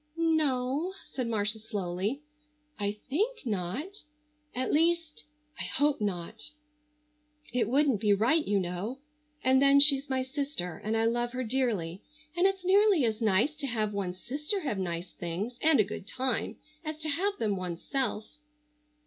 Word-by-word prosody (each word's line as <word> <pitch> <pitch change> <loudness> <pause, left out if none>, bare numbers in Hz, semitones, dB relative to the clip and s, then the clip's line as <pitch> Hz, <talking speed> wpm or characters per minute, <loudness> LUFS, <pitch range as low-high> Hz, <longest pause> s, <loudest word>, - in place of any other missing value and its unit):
"No," 310 0 +1 0.2
said 255 -3 -2
Marcia 215 -1 0
slowly; 205 +4 -3 0.6
"I 205 0 0 0.2
think 425 - -1
not. 230 - -3 0.5
At 255 +1 -1
least—I 300 -2 -1
hope 290 -3 +1
not. 200 +3 -3 1.0
It 230 -3 +1
wouldn't 270 -5 +3
be 210 -2 +3
right, 235 +11 +3
you 205 -5 +1
know. 185 +7 -3 0.5
And 260 +1 +4
then 280 0 +6
she's 280 0 +7
my 260 -1 0
sister 260 - -4
and 220 +1 0
I 225 - +2
love 240 +1 0
her 255 0 -2
dearly, 215 -8 -1 0.3
and 355 +2 +4
it's 385 -1 -2
nearly 390 - +5
as 220 0 -1
nice 215 +6 +3
to 285 -2 -4
have 215 -4 -1
one's 185 -3 -3
sister 300 - -2
have 240 - -2
nice 175 -1 -3
things 195 +9 -4
and 310 -4 +4
a - - +7
good 195 -1 -7
time 255 -1 -1 0.3
as 310 -1 -4
to 310 - -3
have 395 +7 0
them 210 -3 0
one's 180 -3 -5
self." 265 -1 -3
250 Hz, 155 wpm, -29 LUFS, 205-300 Hz, 1.0 s, she's